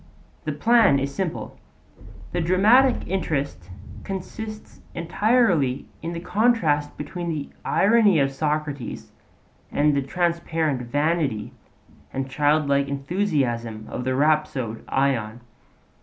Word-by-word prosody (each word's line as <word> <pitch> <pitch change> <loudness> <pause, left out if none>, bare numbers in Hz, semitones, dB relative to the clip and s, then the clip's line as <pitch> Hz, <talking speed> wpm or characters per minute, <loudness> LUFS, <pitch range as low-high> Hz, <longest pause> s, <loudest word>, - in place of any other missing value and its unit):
The - - -1
plan 230 -11 +4
is 140 +1 -2
simple; 185 -1 -4 0.7
the 175 - -1
dramatic 215 +10 +4
interest 145 - -2 0.3
consists 215 +3 -7
entirely 170 - +2 0.2
in 165 +2 -4
the 170 - -4
contrast 175 -8 +1
between 170 +4 -5
the 150 -3 -4
irony 205 -3 +4
of 135 -2 +2
Socrates 150 -2 -3 0.6
and 150 +1 +3
the 140 - +2
transparent 165 -2 -1
vanity 145 -2 -1 0.6
and 135 0 -3
childlike 140 0 +2
enthusiasm 135 - -1
of 125 - -4
the 130 0 -1
rhapsode 145 -6 0
Ion. 120 -4 0
150 Hz, 105 wpm, -24 LUFS, 135-180 Hz, 0.7 s, plan